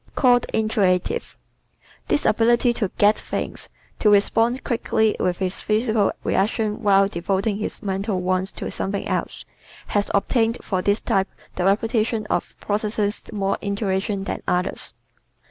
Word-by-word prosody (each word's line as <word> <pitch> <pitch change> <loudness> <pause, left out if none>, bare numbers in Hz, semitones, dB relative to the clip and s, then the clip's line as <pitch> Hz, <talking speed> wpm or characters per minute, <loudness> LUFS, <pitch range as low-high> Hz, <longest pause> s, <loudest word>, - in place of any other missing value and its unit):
Called 245 -2 +4
"Intuitive" 205 -5 0 0.7
¶ - - -37
This - - +1
ability 235 +2 +3
to 215 -5 -1
"get" 205 +1 +4
things, - - -4 0.3
to 215 - +4
respond 225 +5 +3
quickly 220 -2 +1
with 180 -1 0
his 185 -1 -2
physical 215 -1 +1
reactions 215 +1 0
while 195 -1 +4
devoting 195 +3 -1
his 215 - -5
mental 195 0 -1
ones 185 +1 0
to - - -5
something 195 +1 -2
else, - - -3 0.4
has 205 -1 0
obtained 225 +3 +1
for 185 -2 -1
this 205 +3 +1
type 195 0 +1 0.3
the 180 - -1
reputation 220 +2 +1
of - - -1
possessing 210 0 0 0.3
more 195 0 0
"intuition" 200 0 -1
than - - -4
others. 180 +1 -2
205 Hz, 140 wpm, -22 LUFS, 195-225 Hz, 0.7 s, Called